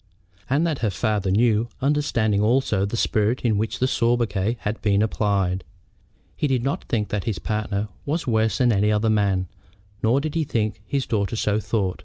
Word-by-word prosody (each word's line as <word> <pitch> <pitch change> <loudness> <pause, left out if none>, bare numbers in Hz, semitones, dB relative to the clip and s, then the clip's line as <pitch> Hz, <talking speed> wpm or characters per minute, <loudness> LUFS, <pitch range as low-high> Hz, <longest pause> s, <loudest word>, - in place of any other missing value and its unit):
And 145 +6 +2
that 160 -5 -1
her 110 - +1
father 100 0 -1
knew, 110 +3 +2
understanding 125 -7 +1
also 110 -3 +2
the 115 - -3
spirit 110 +2 +1
in 115 -3 +1
which 110 +1 -2
the 130 - +1
sobriquet 115 -3 +1
had 105 +2 -3
been 100 0 +2
applied. 100 -4 0 0.7
He 150 - 0
did 130 -3 0
not 135 +2 -2
think 105 -3 -1
that 105 -2 -2
his 110 -6 -1
partner 105 +3 -2 0.2
was 160 +4 -2
worse 110 -3 +1
than 125 -2 +3
another 105 +1 +2
man, 100 -3 +1 0.5
nor 115 +5 +3
did 150 +1 -3
he 165 -1 +1
think 110 -7 -1
that - - -27
his 140 -2 -1
daughter 105 0 -1
so 105 -1 +1
thought. 100 -6 -1
110 Hz, 185 wpm, -23 LUFS, 105-120 Hz, 0.7 s, than